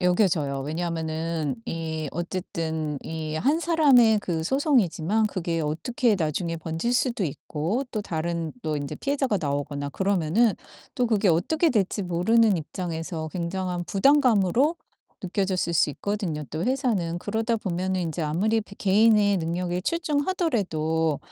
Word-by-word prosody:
여겨져요. 175 Hz, -7 st, +2 dB
왜냐면은 160 Hz, -1 st, -2 dB
이 160 Hz, -2 st, -3 dB
어쨌든 160 Hz, -4 st, -3 dB
이 160 Hz, -1 st, -5 dB
1 280 Hz, -, +2 dB
사람의 265 Hz, -11 st, +5 dB
그 165 Hz, -4 st, -2 dB
소송이지만 220 Hz, -, +2 dB
그게 170 Hz, -4 st, -2 dB
어떻게 220 Hz, -, 0 dB
나중에 165 Hz, +1 st, -1 dB
번질 165 Hz, +9 st, -2 dB
수도 245 Hz, -5 st, +1 dB
있고 160 Hz, -, -2 dB
또 215 Hz, -, -2 dB
다른 165 Hz, -2 st, -3 dB
또 155 Hz, -1 st, -1 dB
인제 145 Hz, +1 st, -4 dB
피해자가 270 Hz, -, 0 dB
나오거나 145 Hz, -1 st, -2 dB
그러면은 195 Hz, -, +2 dB, 0.4 s
또 250 Hz, -3 st, +1 dB
그게 215 Hz, -3 st, +2 dB
어떻게 310 Hz, -, +2 dB
될지 205 Hz, -2 st, 0 dB
모르는 195 Hz, +4 st, +3 dB
입장에서 165 Hz, 0 st, -4 dB
굉장한 180 Hz, 0 st, -3 dB
부담감으로 255 Hz, -, +3 dB, 0.4 s
느껴졌을 185 Hz, -2 st, -1 dB
수 160 Hz, -2 st, +3 dB
있거든요 180 Hz, -4 st, -3 dB
또 155 Hz, +2 st, -3 dB
회사는. 220 Hz, -10 st, 0 dB
그러다 225 Hz, +4 st, -1 dB
보면은 185 Hz, -2 st, -2 dB
인제 165 Hz, 0 st, -3 dB
아무리 195 Hz, +9 st, +1 dB
배 200 Hz, -1 st, -12 dB
개인의 205 Hz, 0 st, +4 dB
능력이 175 Hz, +2 st, -2 dB
출중하더라도 230 Hz, -, 0 dB
180 Hz, 320 characters per minute, -25 LUFS, 160-220 Hz, 0.4 s, 사람의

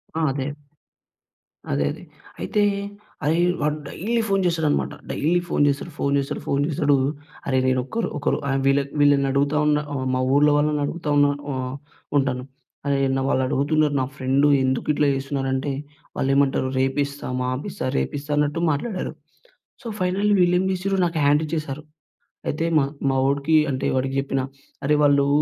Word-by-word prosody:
ఆ! 165 Hz, -, 0 dB
అదే. 135 Hz, +1 st, -3 dB, 1.2 s
అదే 70 Hz, +1 st, +1 dB
అదే. -, -, -9 dB, 0.4 s
అయితే, 95 Hz, -, 0 dB, 0.6 s
అరేయ్ 165 Hz, +3 st, +3 dB, 0.2 s
వాడు 150 Hz, 0 st, 0 dB
డైలీ 230 Hz, +10 st, -1 dB
ఫోన్ 195 Hz, -1 st, +2 dB
చేస్తాడనమాట. 160 Hz, -4 st, +1 dB, 0.2 s
డైలీ 170 Hz, +4 st, +1 dB
ఫోన్ -, -, +2 dB
చేస్తడు, 140 Hz, +4 st, -1 dB
ఫోన్ 140 Hz, -, 0 dB
చేస్తడు, 140 Hz, -, -3 dB
ఫోన్ 140 Hz, 0 st, +1 dB
చేస్తడు. 145 Hz, -2 st, +2 dB, 0.5 s
అరెరేయ్ 130 Hz, -1 st, +1 dB
నేనొక్కరు 130 Hz, -, 0 dB
ఒకరు 145 Hz, -, 0 dB
ఐమ్ 135 Hz, 0 st, 0 dB
వీళ్ళక్ 140 Hz, 0 st, +2 dB
వీళ్ళనడుగుతా 140 Hz, 0 st, +3 dB
ఉన్నా, 150 Hz, 0 st, +3 dB
ఆహ్, 130 Hz, -2 st, -2 dB
మా 130 Hz, -, 0 dB
ఊళ్ళో 145 Hz, +1 st, +5 dB
వాళ్ళనడుగుతా 150 Hz, +2 st, -1 dB
ఉన్నా 145 Hz, 0 st, +5 dB, 0.2 s
వ -, -, -2 dB, 0.7 s
ఉంటాను. 130 Hz, -2 st, -1 dB, 0.4 s
అరేయ్ 140 Hz, -1 st, +2 dB
అన్నా 135 Hz, 0 st, 0 dB
వాళ్ళడుగుతున్నరు, 145 Hz, +3 st, +1 dB
నా -, -, 0 dB
ఫ్రెండు 135 Hz, +2 st, +2 dB, 0.2 s
ఎందుకిట్లా 140 Hz, +3 st, +1 dB
చేస్తున్నరంటే, 135 Hz, 0 st, -2 dB, 0.5 s
వాళ్ళేమంటారు 135 Hz, -1 st, +2 dB
"రేపిస్తా, 140 Hz, +2 st, -1 dB
మాపిస్తా, 130 Hz, +2 st, -3 dB
రేపిస్తా" 145 Hz, +1 st, -4 dB
అన్నట్టు 150 Hz, +3 st, +1 dB
మాట్లాడారు. 185 Hz, +7 st, -3 dB, 0.7 s
సో, 240 Hz, -, -8 dB
ఫైనల్లీ 190 Hz, +3 st, +1 dB
వీళ్ళేం 180 Hz, +1 st, +3 dB
చేసిర్రు, 190 Hz, +1 st, -1 dB
నాకు 165 Hz, -1 st, -3 dB
హ్యాండిచ్చేశారు. 150 Hz, 0 st, 0 dB, 0.7 s
అయితే, 155 Hz, +3 st, -1 dB
మా 140 Hz, -, +3 dB, 0.3 s
మా 135 Hz, -, +1 dB
వోడికి 140 Hz, +3 st, +2 dB, 0.2 s
అంటే, 130 Hz, -, -2 dB
వాడికి 130 Hz, +1 st, -1 dB
చెప్పిన. 135 Hz, -1 st, -1 dB, 0.4 s
అరే 150 Hz, +2 st, +3 dB
వాళ్ళూ 140 Hz, -1 st, +4 dB
145 Hz, 140 wpm, -23 LUFS, 135-155 Hz, 1.2 s, ఊళ్ళో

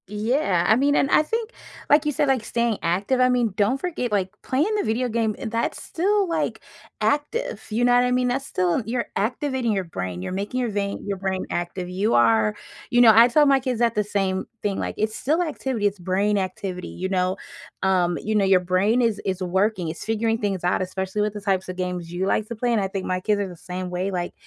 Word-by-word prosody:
Yeah. 210 Hz, -, 0 dB
I 220 Hz, -, +6 dB
mean, 285 Hz, +4 st, +2 dB
and 275 Hz, -, +2 dB
I -, -, +6 dB
think, 450 Hz, +8 st, -3 dB, 0.4 s
like 295 Hz, +1 st, +5 dB
you 300 Hz, -, +1 dB
said, 295 Hz, 0 st, +1 dB
like, 265 Hz, -4 st, +1 dB
staying 235 Hz, -1 st, -1 dB
active, 195 Hz, +10 st, 0 dB
I 255 Hz, 0 st, +5 dB
mean, 240 Hz, -5 st, +1 dB
don't 210 Hz, +7 st, +1 dB
forget, 315 Hz, -8 st, -3 dB
like, 195 Hz, -3 st, +1 dB
playing 305 Hz, +12 st, 0 dB
the 415 Hz, -, 0 dB
video 235 Hz, +3 st, 0 dB
game, 220 Hz, -2 st, 0 dB
that's 230 Hz, +1 st, -2 dB
still, 395 Hz, +3 st, 0 dB
like, 330 Hz, -2 st, -1 dB, 0.4 s
active. 460 Hz, +13 st, -1 dB
You 230 Hz, +3 st, +1 dB
know 245 Hz, -, +4 dB
what 245 Hz, 0 st, +5 dB
I 250 Hz, -, +1 dB
mean? 250 Hz, 0 st, +2 dB
That's 265 Hz, +2 st, -1 dB
still 180 Hz, -1 st, 0 dB
you're 235 Hz, +2 st, -1 dB
activating 250 Hz, +3 st, -1 dB
your 195 Hz, -2 st, 0 dB
brain; 90 Hz, -, -5 dB
you're 95 Hz, -, -4 dB
making 200 Hz, +7 st, -3 dB
your 245 Hz, -2 st, 0 dB
vein 200 Hz, -1 st, -2 dB
your 200 Hz, -1 st, -2 dB
brain 190 Hz, 0 st, -2 dB
active. 175 Hz, +1 st, -3 dB
You 195 Hz, +5 st, 0 dB
are 110 Hz, -2 st, +4 dB, 0.4 s
you 245 Hz, 0 st, +5 dB
know, 230 Hz, -2 st, +9 dB
I 230 Hz, +2 st, +8 dB
tell 295 Hz, +5 st, +4 dB
my 275 Hz, -1 st, +5 dB
kids 255 Hz, -3 st, -2 dB
that 235 Hz, -1 st, +2 dB
the 210 Hz, -, +2 dB
same 195 Hz, -2 st, -1 dB, 0.2 s
thing, 200 Hz, -2 st, -1 dB
like, -, -, -3 dB
"It's 215 Hz, +1 st, 0 dB
still 310 Hz, +9 st, 0 dB
activity; 265 Hz, -9 st, -1 dB
it's 200 Hz, 0 st, -3 dB
brain 195 Hz, +4 st, +1 dB
activity, 185 Hz, -1 st, -4 dB
you 185 Hz, +1 st, -4 dB
know?" 185 Hz, -1 st, 0 dB, 0.5 s
Um, 180 Hz, -2 st, +2 dB
you 215 Hz, +1 st, -1 dB
know, 205 Hz, -2 st, +3 dB
your 190 Hz, -1 st, +5 dB
brain 185 Hz, +7 st, +2 dB
is 225 Hz, -3 st, +1 dB
is 190 Hz, -1 st, -2 dB
working; 190 Hz, 0 st, 0 dB
it's 165 Hz, -, -7 dB
figuring 225 Hz, 0 st, 0 dB
things 200 Hz, -5 st, -2 dB
out, 180 Hz, -, +1 dB
especially 190 Hz, +2 st, -3 dB
with 210 Hz, 0 st, 0 dB
the 210 Hz, -, -7 dB
types 190 Hz, -2 st, 0 dB
of 185 Hz, -, -4 dB
games 180 Hz, -2 st, -4 dB
you 180 Hz, +2 st, -1 dB
like 215 Hz, +1 st, 0 dB
to 235 Hz, -, -4 dB
play, 240 Hz, +2 st, -1 dB
and 230 Hz, -, +2 dB
I 195 Hz, -, 0 dB
think 190 Hz, 0 st, -4 dB
my 185 Hz, 0 st, 0 dB
kids 205 Hz, +1 st, 0 dB
are 200 Hz, -, -2 dB
the 180 Hz, -, -9 dB
same 180 Hz, +1 st, -6 dB
way. 180 Hz, +2 st, -2 dB
Like, 175 Hz, -2 st, -3 dB
210 Hz, 235 wpm, -23 LUFS, 185-250 Hz, 0.5 s, know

